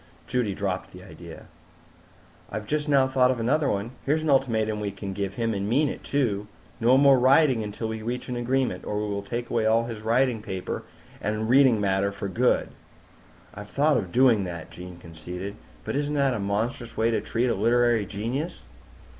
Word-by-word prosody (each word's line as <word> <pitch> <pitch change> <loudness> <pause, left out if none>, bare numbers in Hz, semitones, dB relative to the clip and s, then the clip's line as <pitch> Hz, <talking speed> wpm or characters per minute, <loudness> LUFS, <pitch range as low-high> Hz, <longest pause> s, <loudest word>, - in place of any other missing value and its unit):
Judy 120 -6 -1
dropped 95 -2 -3
the 90 0 -11
idea. 85 -2 -11 1.0
"I've 105 +1 -5
just 150 +5 -1
now 135 -2 +4
thought 130 -1 +3
of 130 -2 0
another 140 +6 +1
one. 100 +4 -2
Here's 155 +3 +1
an 155 - +1
ultimatum 110 -5 +1
we 105 -1 -2
could 100 0 -6
give 100 0 -3
him 115 -1 -1
and 100 0 -2
mean 140 +5 +3
it, - - -7
too. 105 -8 -1 0.3
No 120 +3 +5
more 140 -1 +6
writing 130 -1 +4
until 105 +2 -4
we 110 0 -4
reach 120 +3 -4
an 125 - -3
agreement, 125 +2 -1
or 105 - -4
we 105 - -1
will 100 - -2
take 120 +4 -5
away 110 -2 +1
all 115 +1 +3
his 115 -3 -6
writing 115 +1 +1
paper 95 -4 -4 0.4
and 110 +2 -2
reading 130 -2 +5
matter 100 0 +1
for 100 0 -5
good!" 120 +6 +1 0.8
"I'd 105 0 -9
thought 145 +6 +2
of 90 - -1
doing 120 -4 +4
that," 85 -2 -7
Jean 90 0 -10
conceded. 90 +4 -7 0.3
"But - - -3
isn't 145 +1 -1
that 140 -2 +2
a 120 - -3
monstrous 110 +4 -2
way 115 +1 +2
to 115 - 0
treat 120 +2 -1
a 125 - +2
literary 115 0 +2
genius?" 120 - -4
115 Hz, 195 wpm, -26 LUFS, 100-130 Hz, 1.0 s, more